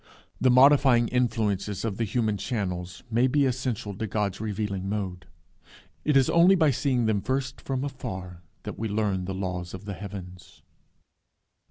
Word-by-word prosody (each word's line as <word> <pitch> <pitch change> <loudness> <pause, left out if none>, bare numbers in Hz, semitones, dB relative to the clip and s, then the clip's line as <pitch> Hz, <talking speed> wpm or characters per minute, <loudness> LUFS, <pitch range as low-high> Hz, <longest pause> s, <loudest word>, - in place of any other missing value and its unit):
The 130 - +4
modifying 130 -2 +6
influences 110 -5 0
of 105 -4 -2
the 115 - 0
human 110 0 0
channels 90 -6 -4
may 120 +3 +3
be 140 +2 +2
essential 125 -6 -2
to 110 - -3
God's 100 -1 -2
revealing 100 -3 -3
mode. 95 -3 -4 0.8
It 150 -2 +3
is 135 - +4
only 175 +3 +6
by 160 -5 +4
seeing 130 -2 +1
them 110 -2 +1
first 130 +2 -2
from 135 -1 -2
afar 95 -11 -6 0.2
that - - -7
we 110 - -1
learn 100 -3 0
the 95 +1 -4
laws 90 -2 -4
of 95 - -10
the 100 - -4
heavens. 95 -2 -9
110 Hz, 160 wpm, -26 LUFS, 95-130 Hz, 0.8 s, modifying